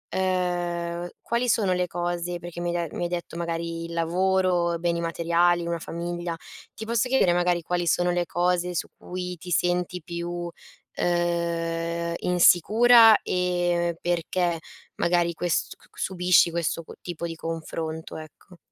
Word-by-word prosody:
uhm, 175 -2 -1
quali 240 +1 -1
sono 200 -5 +2
le 180 0 0
cose 175 0 -3
perché 175 0 -8
mi 175 0 -1
hai 170 -2 -1
de - - -11
mi - - -2
hai 175 - -1
detto 175 -1 -5
magari 170 0 -3
il 170 - -7
lavoro, 175 0 +1
beni 170 0 0
materiali, 170 +1 +2
una 170 0 -2
famiglia, 170 +1 -4 0.4
ti 220 - -6
posso 235 +2 0
chiedere 250 -9 +4
magari 175 -1 +1
quali 175 +1 -1
sono 175 +2 +2
le 175 -1 0
cose 180 +1 0
su - - -1
cui 180 0 -5
ti 180 +2 -10
senti 180 0 0
più, 170 +1 -5 0.7
uhm, 170 -1 -1
insicura? 220 +6 +6
E 175 -1 0
perché, 175 0 0 0.4
magari, 170 0 +2
quest 170 0 -1
q - - -24
q - - -25
subisci 180 -2 +3
questo 170 0 -1
cu - - -11
tipo 170 -1 -5
di 165 -1 -4
confronto, 160 0 -5
ecco. 160 +3 -13
175 Hz, 150 wpm, -25 LUFS, 170-180 Hz, 0.7 s, insicura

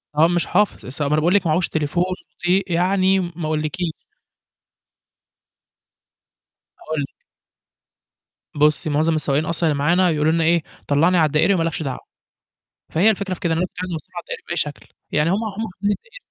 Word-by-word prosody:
هو 155 +2 +5
مش 175 -1 0
حافظ 205 +4 +1
السواق 140 +3 -3
ما 150 - +1
أنا 155 - +3
باقول 175 +3 +2
لِك 195 - +3
ما - - +2
عهوش 170 +3 +1
تليفون، 160 +3 0 0.3
بطئ 180 +1 0
يعني 190 +2 +3
م 175 -2 -3
ما 170 - -4
أقولكيش. 155 +2 -1 2.9
أقول 155 -1 -3
لِك 140 - -7 1.4
بُصّي، 150 +1 +3
مُعظم 155 +2 +2
السواقين 150 0 0
أصلًا 165 0 0
اللي 145 - -1
معانا 175 +5 +3
يقولوا 155 -1 +2
لنا 165 0 +1
إيه، 165 0 +3 0.2
طلّعني 165 +6 +3
على 160 - +5
الدائري 155 +6 +3
وما 165 -3 +1
لكش 165 -1 -2
دعوة، 135 -3 -4 0.9
فهي 180 +7 +4
الفكرة 200 -3 -1
في 180 - -7
كده 170 -4 0
إن - - 0
أنا 180 +2 0
كنت - - -13
عايز 185 - -4
أوصّله 160 -4 -6
على 175 - -4
الدائري - - -6
بأي 170 - -2
شكل 150 -2 -2 0.2
يعني 150 +2 +2
هم - - +2
هم 220 +1 -4
حافظين 200 +3 -2
الدائري 475 - -7
165 Hz, 190 wpm, -21 LUFS, 155-185 Hz, 2.9 s, هو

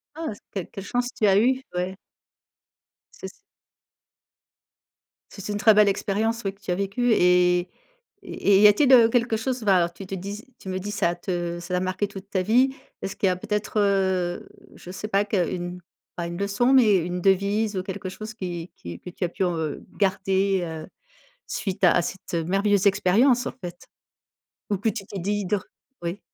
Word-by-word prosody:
Ah, 320 -7 -4
s - - -17
quelle 190 -4 -4
quelle 195 - -8
chance 245 +3 -1
tu 215 - +1
as 195 -1 +5
eu, 260 +4 +2
ouais. 180 +1 -2 1.2
C'est - - -9
s - - -13 1.9
C'est 200 0 -8
une 205 - -2
très 220 0 +6
belle 210 -1 +6
expérience, 215 +3 -1
oui, 195 0 -2
que 200 - -30
tu 190 - -6
as - - +2
vécue 200 +5 0
et 180 -1 +4 0.6
et 200 - +1
et - - +7
il 200 - +5
y - - +10
a-t-il, 255 +6 +5
heu, 230 -3 +8
quelque 235 -1 +1
chose 250 +1 -3
va 185 -4 +3
tu 175 +3 -11
te 195 - -5
dis 200 +4 -6
tu 190 - -11
me 185 - -2
dis 200 +2 -5
ça 175 -4 0
te 175 -1 -3
ça 180 +1 -3
a 180 - 0
marqué 185 +2 -1
toute 195 -1 -10
ta 185 -2 0
vie. 255 +7 +3 0.3
Est-ce 195 - -4
qu'il - - 0
y - - +3
a 180 - 0
peut-être, 210 +3 -3
heu, 190 -3 0 0.3
je 175 - -11
sais 190 +3 -5
pas 200 0 +2
qu'une 180 -2 -2 0.4
pas 170 - -3
une 170 0 -6
leçon, 200 +6 +1
mais 225 -7 +6
une 180 +1 -2
devise 200 +3 +1
ou 185 - -1
quelque 190 0 -6
chose 215 +4 -8
qui 175 -4 -6
qui 85 0 -9
que 180 - -9
tu 180 - -17
as - - +1
pu 190 +3 -2
en, 175 -1 0
heu, 155 -2 -4
garder, 195 -1 +1
heu, 160 -1 -7 0.6
suite 195 -1 -4
à 175 - +7
à - - +3
cette, 185 0 -5
heu, 165 - 0
merveilleuse 200 +2 +2
expérience, 235 +7 +3
en - - -3
fait? 175 0 -8 0.8
Ou 205 - +2
que 210 - 0
tu 215 -2 -3
t'es 200 - -7
di 205 +2 -1
dr 200 +1 -1 0.4
oui. 175 +3 -4
195 Hz, 205 wpm, -24 LUFS, 180-210 Hz, 1.9 s, y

